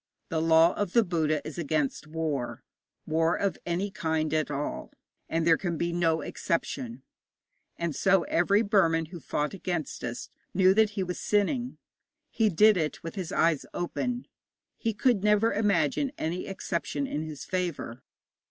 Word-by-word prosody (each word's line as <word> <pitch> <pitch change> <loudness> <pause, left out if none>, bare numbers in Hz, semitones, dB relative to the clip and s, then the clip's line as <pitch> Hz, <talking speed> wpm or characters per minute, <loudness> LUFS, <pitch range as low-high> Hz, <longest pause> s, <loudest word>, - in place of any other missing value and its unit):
The 160 -1 0
law 165 +1 +5
of 205 -3 -2
the 235 - +5
Buddha 155 -5 0
is 155 +2 -6
against 155 -2 -1
war 155 -5 -3 0.4
war 165 +2 +2
of 200 -1 -1
any 185 +4 -1
kind 160 -5 -1
at 155 -1 +1
all 145 0 -4 0.4
and 165 0 0
there 165 -1 +5
can 175 -3 -2
be 170 +1 -1
no 165 -2 +2
exception. 235 - -3 0.7
And 170 -4 -2
so 195 -2 +3
every 200 +6 +2
Burman 170 -6 +3
who 175 - -6
fought 150 +2 -2
against 175 -5 -4
us 120 0 -5 0.2
knew 190 0 +6
that 220 +1 +4
he 190 - +1
was 180 -1 -4
sinning. 240 +5 0 0.5
He 220 -2 +2
did 210 +3 +5
it 155 -3 -2
with 165 - -5
his 185 -5 -5
eyes 160 -3 +2
open; 245 +8 -2 0.5
he 225 -2 -2
could 215 -2 +2
never 210 +2 +3
imagine 220 +7 +1
any 170 +3 -3
exception 195 +7 -3
in 155 - -3
his 155 -2 -7
favour. 175 -9 -3
170 Hz, 160 wpm, -28 LUFS, 160-200 Hz, 0.7 s, knew